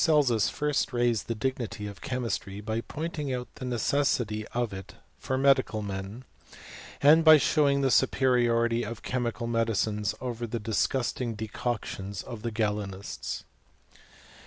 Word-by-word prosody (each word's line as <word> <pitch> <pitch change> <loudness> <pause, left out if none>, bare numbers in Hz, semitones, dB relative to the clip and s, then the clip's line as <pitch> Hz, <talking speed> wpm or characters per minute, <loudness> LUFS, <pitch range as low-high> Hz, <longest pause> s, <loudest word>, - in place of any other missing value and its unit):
8 135 -8 +4
first 150 -2 0
raised 120 -3 +1
the 115 - -2
dignity 115 -3 -3
of 100 -1 -8
chemistry, 115 -6 -3
by 110 +2 -2
pointing 155 0 -4
out 125 -1 -4
the 130 - -7
necessity 120 -3 0
of 120 -4 -2
it 95 -1 -9 0.2
for 130 - -2
medical 130 -5 +3
men, 100 +5 -6 0.8
and 155 +3 +7
by 155 -1 +9
showing 140 -1 +3
the 135 -1 +2
superiority 120 -3 +3
of 115 0 -6
chemical 120 -3 -2
medicines 110 -3 0
over 120 -2 -4
the 115 +1 -3
disgusting 115 +2 -1
decoctions 110 -2 -4
of 115 -4 -8
the 115 - -2
Oalenists. 100 - -3
120 Hz, 135 wpm, -28 LUFS, 105-130 Hz, 0.8 s, by